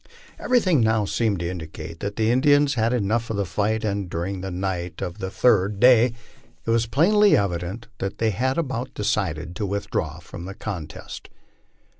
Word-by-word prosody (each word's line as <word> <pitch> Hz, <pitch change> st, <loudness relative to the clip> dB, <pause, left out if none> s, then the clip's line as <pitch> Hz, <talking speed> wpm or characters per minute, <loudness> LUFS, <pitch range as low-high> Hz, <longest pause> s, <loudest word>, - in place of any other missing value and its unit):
Everything 185 Hz, -, +3 dB
now 110 Hz, -1 st, +2 dB
seemed 105 Hz, -3 st, 0 dB
to 85 Hz, -, -2 dB
indicate 85 Hz, -1 st, -7 dB
that 100 Hz, 0 st, -4 dB
the 110 Hz, 0 st, +2 dB
Indians 145 Hz, +3 st, +4 dB
had 115 Hz, -2 st, +1 dB
had 125 Hz, -4 st, +1 dB
enough 115 Hz, +4 st, 0 dB
of 110 Hz, -, -2 dB
the 100 Hz, -, 0 dB
fight, 105 Hz, +6 st, -1 dB
and 100 Hz, -3 st, -2 dB
during 90 Hz, +3 st, -3 dB
the 95 Hz, -, -4 dB
night 90 Hz, -1 st, -3 dB
of 90 Hz, -, -5 dB
the 95 Hz, -, -3 dB
third 100 Hz, -2 st, +2 dB
day 125 Hz, -1 st, +6 dB, 0.5 s
it 115 Hz, -, 0 dB
was 115 Hz, 0 st, +2 dB
plainly 205 Hz, -, +4 dB
evident 95 Hz, +2 st, -2 dB
that 95 Hz, -, -3 dB
they 115 Hz, -1 st, +1 dB
had 130 Hz, +7 st, 0 dB
about 130 Hz, -5 st, -3 dB
decided 90 Hz, -5 st, -1 dB
to 105 Hz, -, -1 dB
withdraw 100 Hz, +1 st, -2 dB
from 85 Hz, -, -9 dB
the 95 Hz, +1 st, -7 dB
contest. 90 Hz, -9 st, -7 dB
105 Hz, 180 wpm, -24 LUFS, 95-120 Hz, 0.5 s, day